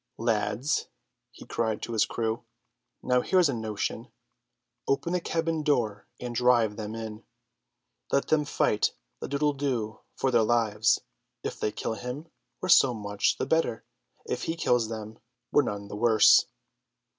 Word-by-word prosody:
"Lads," 115 Hz, +4 st, 0 dB, 0.4 s
he 115 Hz, -, -14 dB
cried 110 Hz, -2 st, -2 dB
to 120 Hz, -, -4 dB
his 110 Hz, -, +2 dB
crew, 115 Hz, 0 st, -2 dB, 0.6 s
"now 125 Hz, 0 st, +3 dB
here's 180 Hz, -1 st, +3 dB
a -, -, 0 dB
notion. 110 Hz, +1 st, -3 dB, 0.8 s
Open 140 Hz, +5 st, 0 dB
the 180 Hz, -, +1 dB
cabin 165 Hz, -1 st, -1 dB
door 120 Hz, -9 st, 0 dB
and 120 Hz, -1 st, -5 dB
drive 120 Hz, -3 st, +3 dB
them 110 Hz, 0 st, -5 dB
in. 110 Hz, -1 st, -7 dB, 0.9 s
Let 140 Hz, -, +1 dB
them 155 Hz, -1 st, +3 dB
fight 105 Hz, -6 st, +1 dB, 0.3 s
the -, -, -5 dB
doodle 145 Hz, +1 st, +1 dB
doo 125 Hz, -6 st, -2 dB, 0.2 s
for 135 Hz, -, 0 dB
their 120 Hz, -2 st, +4 dB
lives. 110 Hz, -1 st, +2 dB, 0.4 s
If -, -, -4 dB
they 105 Hz, -, 0 dB
kill 110 Hz, -, -3 dB
him, 125 Hz, +8 st, -6 dB, 0.3 s
we're 185 Hz, -, -3 dB
so 135 Hz, -7 st, +6 dB
much 105 Hz, -1 st, 0 dB
the -, -, -1 dB
better; 160 Hz, -8 st, 0 dB, 0.4 s
if -, -, -3 dB
he 165 Hz, -, -1 dB
kills 120 Hz, -8 st, +1 dB
them, 110 Hz, -1 st, -7 dB, 0.3 s
we're -, -, +5 dB
none 100 Hz, -6 st, -4 dB
the 105 Hz, -, -7 dB
worse." 110 Hz, -1 st, +6 dB
115 Hz, 155 wpm, -28 LUFS, 110-140 Hz, 0.9 s, so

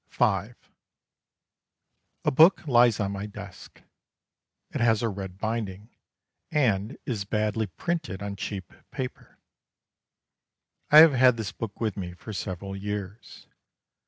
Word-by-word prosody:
V -, -, +2 dB
A -, -, -1 dB, 1.8 s
book 160 Hz, +5 st, +6 dB
lies 120 Hz, -4 st, +5 dB
on 100 Hz, -2 st, -1 dB
my 100 Hz, +1 st, -5 dB
desk. 105 Hz, -, -11 dB, 0.9 s
It -, -, -2 dB
has 115 Hz, -1 st, +3 dB
a 115 Hz, -, +1 dB
red 95 Hz, -2 st, -7 dB
binding 110 Hz, -1 st, -4 dB, 0.5 s
and 110 Hz, -5 st, +1 dB
is 110 Hz, -6 st, -2 dB
badly 105 Hz, +1 st, -1 dB
printed 100 Hz, -, -4 dB
on 100 Hz, -1 st, -4 dB
cheap 95 Hz, -3 st, -6 dB, 0.2 s
paper. 125 Hz, -1 st, -7 dB, 1.5 s
I 150 Hz, -, +7 dB
have 160 Hz, -2 st, +8 dB
had 125 Hz, -1 st, +5 dB
this 110 Hz, -4 st, -4 dB
book 110 Hz, -3 st, -7 dB
with 110 Hz, -4 st, -2 dB
me 90 Hz, -3 st, -5 dB
for 110 Hz, +4 st, -9 dB
several 95 Hz, 0 st, -5 dB
years. 105 Hz, +1 st, -6 dB
105 Hz, 125 wpm, -26 LUFS, 100-120 Hz, 1.8 s, have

